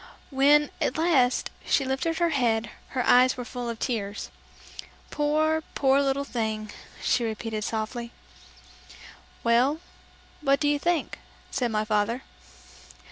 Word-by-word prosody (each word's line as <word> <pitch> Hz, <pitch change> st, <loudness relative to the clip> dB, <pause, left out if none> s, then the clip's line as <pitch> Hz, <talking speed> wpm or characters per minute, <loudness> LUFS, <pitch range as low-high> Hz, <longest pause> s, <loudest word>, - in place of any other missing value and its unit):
When, 285 Hz, +2 st, +4 dB
at 255 Hz, -, 0 dB
last, 290 Hz, -7 st, +2 dB
she 275 Hz, -, +1 dB
lifted 270 Hz, +5 st, -1 dB
her 345 Hz, -1 st, +2 dB
head, 230 Hz, -5 st, +1 dB, 0.3 s
her 250 Hz, -, +1 dB
eyes 250 Hz, +1 st, +5 dB
were 245 Hz, -, -5 dB
full 245 Hz, -1 st, -5 dB
of 230 Hz, -, -4 dB
tears. 210 Hz, -5 st, -3 dB, 0.8 s
"Poor, 310 Hz, +2 st, +1 dB
poor 270 Hz, 0 st, +3 dB
little 275 Hz, 0 st, 0 dB
thing!" 220 Hz, -5 st, -3 dB, 0.3 s
she 245 Hz, -, +2 dB
repeated 220 Hz, -1 st, -3 dB
softly. 230 Hz, +2 st, -3 dB, 1.3 s
"Well, 245 Hz, +6 st, +3 dB, 0.6 s
what 275 Hz, -2 st, +3 dB
do 295 Hz, -, +1 dB
you 290 Hz, 0 st, +2 dB
think?" 340 Hz, 0 st, -1 dB, 0.3 s
said 245 Hz, -3 st, 0 dB
my 215 Hz, -1 st, -1 dB
father. 215 Hz, +4 st, 0 dB
255 Hz, 130 wpm, -26 LUFS, 225-290 Hz, 1.3 s, eyes